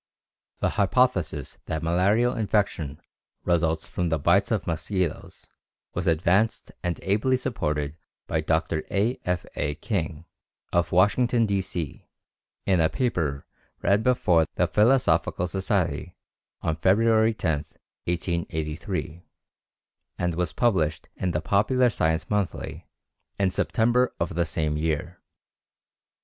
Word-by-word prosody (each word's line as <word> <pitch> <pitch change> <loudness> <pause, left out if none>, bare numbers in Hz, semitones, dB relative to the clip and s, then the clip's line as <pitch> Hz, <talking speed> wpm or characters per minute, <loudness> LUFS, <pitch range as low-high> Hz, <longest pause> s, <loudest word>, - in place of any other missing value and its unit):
The - - +2
hypothesis 95 - +1
that 80 0 -3
malarial 100 +9 +3
infection 100 - -1 0.4
results 80 -2 +1
from 90 -1 -2
the 80 - +1
bites 70 - +3
of - - 0
mosquitoes 90 -5 -3 0.5
was - - -2
advanced 90 +7 +2
and 90 -1 -2
ably 110 +7 +2
supported 75 - -2 0.3
by 80 - -1
Dr. 80 0 0
A. 110 +6 0
F. 90 -1 -1
A. 75 0 -1
King, 85 -3 -3 0.5
of 85 -1 +2
Washington, 115 +6 +3
D. 100 -2 +1
C., 85 -5 -5 0.6
in 95 -3 +3
a 80 - +3
paper 80 - -1 0.4
read 100 +2 +3
before 90 -10 +3
the - - +3
Philosophical 115 -5 +2
Society 95 +1 -1 0.5
on 80 -1 0
February 110 +5 +3
10, 80 -7 0 0.5
1883, 85 -2 -3 1.0
and 90 0 -1
published 80 -10 +1
in 95 - -1
the 75 -3 -1
Popular 110 - +3
Science 80 -4 0
Monthly 105 -3 -3 0.5
in 95 -1 +2
September 120 +6 +1
of 85 - -1
the 85 -1 0
same 75 -1 -1
year. 80 +3 -2
90 Hz, 115 wpm, -26 LUFS, 80-105 Hz, 1.0 s, malarial